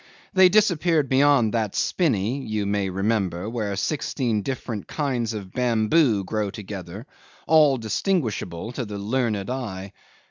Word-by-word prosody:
They 190 Hz, -1 st, +7 dB
disappeared 175 Hz, -7 st, +2 dB
beyond 135 Hz, -4 st, +4 dB
that 110 Hz, -3 st, -1 dB
spinney 130 Hz, -, 0 dB
(you 110 Hz, -3 st, -2 dB
may 100 Hz, -1 st, 0 dB
remember) 95 Hz, -1 st, -1 dB
where 110 Hz, -3 st, -3 dB
sixteen 120 Hz, -1 st, -1 dB
different 120 Hz, -3 st, -5 dB
kinds 125 Hz, -7 st, -2 dB
of 95 Hz, -3 st, -8 dB
bamboo 120 Hz, -1 st, +2 dB
grow 105 Hz, +2 st, -2 dB
together, 100 Hz, 0 st, -8 dB, 0.4 s
all 150 Hz, -4 st, +5 dB
distinguishable 110 Hz, -, -2 dB
to 125 Hz, 0 st, -4 dB
the 105 Hz, -1 st, -6 dB
learned 110 Hz, -1 st, -1 dB
eye. 100 Hz, -7 st, -5 dB
110 Hz, 130 wpm, -24 LUFS, 100-135 Hz, 0.4 s, They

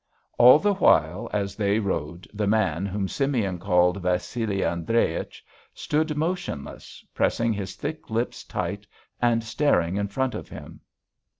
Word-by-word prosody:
All 125 Hz, +3 st, +9 dB
the 205 Hz, +5 st, +1 dB
while 90 Hz, -, +2 dB
as 100 Hz, -1 st, -2 dB
they 100 Hz, -1 st, +1 dB
rowed 85 Hz, -5 st, -3 dB
the 105 Hz, -1 st, -1 dB
man, 100 Hz, -4 st, +1 dB
whom 100 Hz, 0 st, -2 dB
Simeon 115 Hz, -9 st, -1 dB
called 90 Hz, 0 st, +2 dB
Vassili 90 Hz, +3 st, -1 dB
Andreich, 85 Hz, +7 st, -1 dB, 0.3 s
stood 150 Hz, 0 st, -1 dB
motionless, 165 Hz, -, -4 dB
pressing 115 Hz, -1 st, +1 dB
his 100 Hz, -2 st, -5 dB
thick 155 Hz, +2 st, -6 dB
lips 115 Hz, +2 st, -2 dB
tight -, -, -4 dB, 0.3 s
and 120 Hz, -1 st, +2 dB
staring 110 Hz, -, +1 dB
in 100 Hz, 0 st, -1 dB
front 130 Hz, +5 st, -1 dB
of -, -, -7 dB
him. -, -, -10 dB
105 Hz, 135 wpm, -25 LUFS, 90-125 Hz, 0.3 s, All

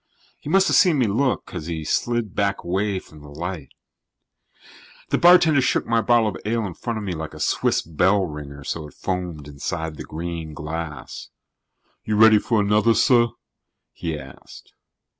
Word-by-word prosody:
He -, -, -8 dB
must 195 Hz, +3 st, +4 dB
have -, -, +2 dB
seen 175 Hz, -5 st, +5 dB
me 130 Hz, -, +3 dB
look, 120 Hz, +6 st, 0 dB
because 80 Hz, -, -7 dB
he 80 Hz, -2 st, -4 dB
slid 120 Hz, +4 st, -1 dB
back 100 Hz, -1 st, -1 dB
away 95 Hz, +3 st, -1 dB
from 80 Hz, -4 st, -11 dB
the 75 Hz, -, -12 dB
light. 80 Hz, -1 st, -6 dB, 1.4 s
The -, -, +1 dB
bartender 170 Hz, -5 st, +6 dB
shook -, -, +1 dB
my 115 Hz, 0 st, +2 dB
bottle 120 Hz, -1 st, +3 dB
of -, -, -6 dB
ale 115 Hz, +1 st, -1 dB
in 95 Hz, -, -5 dB
front 115 Hz, +6 st, -4 dB
of 105 Hz, -, -5 dB
me 95 Hz, -, -2 dB
like 80 Hz, -1 st, -6 dB
a -, -, -10 dB
Swiss -, -, +1 dB
bell 95 Hz, +5 st, +2 dB
ringer 70 Hz, -3 st, -8 dB
so 75 Hz, +2 st, -4 dB
it 75 Hz, -, -17 dB
foamed 90 Hz, -5 st, -4 dB
inside 80 Hz, +2 st, -5 dB
the -, -, -6 dB
green 80 Hz, -1 st, -6 dB
glass. 75 Hz, 0 st, -6 dB, 0.7 s
"You 105 Hz, -, -1 dB
ready 110 Hz, 0 st, +7 dB
for 110 Hz, +1 st, 0 dB
another, 105 Hz, +3 st, +3 dB
sir?" 120 Hz, -2 st, +4 dB, 0.7 s
he 80 Hz, -2 st, -4 dB
asked. 65 Hz, -1 st, -13 dB
95 Hz, 175 wpm, -22 LUFS, 80-115 Hz, 1.4 s, ready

